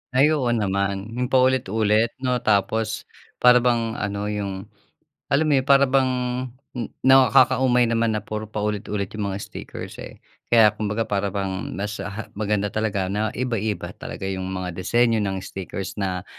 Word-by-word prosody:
Ay, 140 +4 +5
oo 140 -5 0
naman. 100 0 -1
'Yong 125 +2 -2
paulit-ulit, 115 -4 +2
'no? 125 -1 +1
Tapos 110 +1 0 0.4
para 125 0 +8
bang 120 -2 +1
ano 105 0 -2
'yong 100 -2 -4 0.7
alam 150 +3 +4
mo - - +2
yun - - -6
para 140 0 +6
bang 130 -1 +3 0.6
n 120 -4 -4 0.2
nakaka-umay 130 -1 +5
naman 115 -1 +1
na 105 - -4
puro 110 0 -5
paulit-ulit 105 -1 -3
'yong 105 -1 -3
mga 95 0 -3
stickers, - - -8
eh. - - -11 0.2
Kaya 110 -3 +6
kumbaga 105 +1 -2
para 100 -1 -1
bang 95 -1 -4
mas, 105 +1 -4
ha 100 +2 -6
maganda 105 0 -1
talaga 105 -3 -1
na 105 +1 0
iba-iba 115 -4 -2
talaga - - -7
yung 95 -1 -3
mga 90 -1 -4
disenyo 115 +4 +2
ng 95 -2 -2
stickers 95 +1 -6
na 90 -1 -2
105 Hz, 155 wpm, -23 LUFS, 100-120 Hz, 0.7 s, para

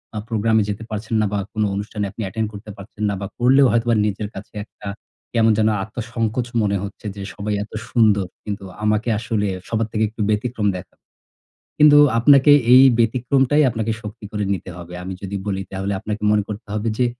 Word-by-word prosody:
আ - - -3
প্রোগ্রামে 110 0 +2
যেতে 105 +2 -4
পারছেন 110 +1 -5
না - - +2
বা 100 - 0
কোন 110 - 0
অনুষ্ঠানে 105 +1 -3
আপনি - - -8
attend 110 +2 -2
করতে 105 +1 -10
পারছেন 100 +2 -9
না - - -1
বা 100 - -3
করলেও 130 +2 +5
হয়তোবা 115 0 +2
নিজের 105 0 -2
কাছে 95 - -10
একটা, 105 -2 -13 0.5
কেমন 115 -1 +4
যেন 110 0 +3 0.2
আত্মসংকোচ 115 +2 -3
মনে 100 -1 +1
হচ্ছে 100 +2 -9
যে, 100 - -7
"সবাই 105 0 -3
এত 105 - -14 0.2
সুন্দর, 105 -5 +3 0.2
কিন্তু 100 -1 -5 0.2
আমাকে 105 +2 +1
আসলে 110 -2 -1 0.2
সবার 110 -1 0
থেকে 110 - 0
একটু 110 +1 -8
ব্যতিক্রম 110 0 0
দেখা" 90 - -12 0.8
কিন্তু 150 -1 +7 0.2
আপনাকে 140 +4 +6 0.2
এই 130 - +9 0.2
ব্যতিক্রমটাই 130 +5 +2
আপনাকে 115 -1 -2
শক্তি 105 0 -9
করে 105 -1 -2
নিতে 95 - -6
হবে। 90 0 -10
আমি 95 +1 -5
যদি 100 0 -5
বলি 95 -2 -2
তাহলে 95 +1 -2
আপনাকে 105 +1 -5
মনে 105 -1 +2
করতে 105 0 -7
হবে 110 +2 -1
যে, 125 - +3
110 Hz, 190 wpm, -21 LUFS, 105-115 Hz, 0.8 s, এই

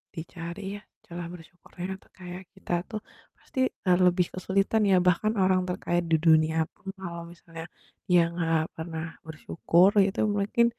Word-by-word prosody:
dicari 170 +3 -7 0.2
ya 205 - -13 0.2
celah 175 -1 -6
bersyukurnya 175 +1 -10
atau - - -26
kayak 180 0 -7
kita - - -6 0.2
tuh 215 - -4 0.4
pasti, 265 - -7 0.3
eee, 180 -1 +5
lebih 180 0 +3
kesulitan 195 +4 +1
ya, 190 - +6
bahkan 195 +5 +3
orang 185 0 +4
terkaya 175 -1 0
di 160 - +6
dunia 160 0 +5 0.2
pun 195 - -10
kalau 170 -2 -5
misalnya 165 -1 -10 0.4
dia 175 -1 +6 0.2
gak 165 -2 +2 0.2
pernah 160 0 -4 0.2
bersyukur, 170 +3 +3 0.2
itu 195 - -2
mungkin 205 +3 +2
175 Hz, 150 wpm, -27 LUFS, 165-190 Hz, 0.4 s, ya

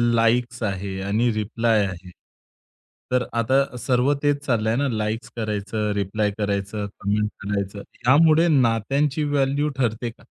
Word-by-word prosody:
Likes 120 +1 +1
आहे 95 -1 -3
आणि 110 +5 +1
reply 110 0 +1
आहे. 90 -1 -7 1.0
तर 125 -1 +2
आता 125 +3 +1
सर्व 125 +3 +2
तेच 145 0 +1
चाललंय 115 -3 +1
ना, 140 +3 +1
लाइक्स 110 0 -2
करायचं, 105 -1 -2
रिप्लाय 105 +1 0
करायचं, 100 0 -2
कमेंट 105 +1 0
करायचं. 100 0 -3 0.3
यामुळे 160 +4 +6
नात्यांची 135 +2 +2
व्हॅल्यू 145 0 +1
ठरते 120 -1 -1
का? 115 - -17
115 Hz, 125 wpm, -23 LUFS, 105-130 Hz, 1.0 s, यामुळे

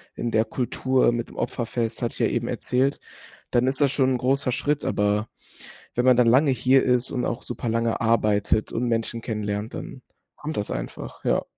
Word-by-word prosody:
in 120 - -3
der 110 0 +3
Kultur 130 +2 +1
mit 120 0 -3
dem - - -14
Opferfest, 115 -1 -2
hatte 120 - -1
ich - - -9
ja - - +3
eben - - -2
erzählt, 130 +3 0 0.5
dann 125 +1 +2
ist 130 +1 0
das 145 -2 +4
schon 130 -2 +2
'n - - 0
großer 130 +1 +1
Schritt, 145 +4 -1
aber 105 +1 0 0.7
wenn 125 - +1
man 130 -1 +6
dann 125 -1 +5
lange 135 +5 +5
hier 130 +1 +3
ist 125 0 +2
und 125 - -2
auch - - -2
super - - -5
lange 115 0 0
arbeitet 110 -2 +2
und 115 - -2
Menschen 115 0 -1
kennenlernt, 105 -1 -3
dann 130 - -8 0.3
kommt 155 +1 -6
das 105 - -2
einfach, - - -6
ja. - - +2
120 Hz, 195 wpm, -24 LUFS, 115-130 Hz, 0.7 s, man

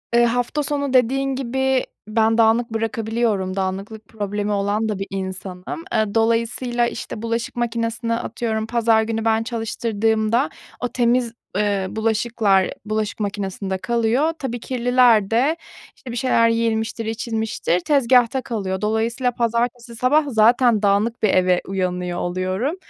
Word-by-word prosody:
ııı, 240 0 +6
hafta 245 +5 0
sonu 285 -2 -2
dediğin 265 +2 +2
gibi 265 0 0 0.2
ben 225 +1 +2
dağınık 230 +2 +3
bırakabiliyorum, 225 -3 -1
dağınıklık 195 +3 -4
problemi 205 -1 -3
olan 205 +2 0
da 205 -2 -2
bir 195 - -4
insanım. 190 - -6
Iıı, 215 -1 0
dolayısıyla, 230 +2 +1
işte, 215 - -6
bulaşık 230 +1 -3
makinesini 230 -1 -1
atıyorum 225 -1 -2
pazar 230 -2 +3
günü 225 0 -3
ben 225 0 +2
çalıştırdığımda 225 +1 0 0.3
o 245 - -1
temiz, 240 0 +1 0.2
ııı, 200 -2 0
bulaşıklar 220 -3 +2 0.2
bulaşık 215 0 -2
makinesinde 195 -2 -3
kalıyor. 235 - +1
Tabii 245 -3 -3
kirliler 245 -4 +3
de, 275 +8 +2 0.4
işte, 245 - -10
bir - - -5
şeyler 230 -3 +3
yenilmiştir, 230 0 -1
içilmiştir, 220 -5 -1
tezgâhta 255 -1 +3
kalıyor. 195 -7 -3
Dolayısıyla 230 +4 0
pazartesi 235 0 -1
sabah 265 +6 +3
zaten 230 0 +4
dağınık 210 +3 +1
bir 210 - +4
eve 180 -1 +3
uyanıyor 180 -2 -2
oluyorum. 185 - -1
225 Hz, 130 wpm, -21 LUFS, 210-240 Hz, 0.4 s, ııı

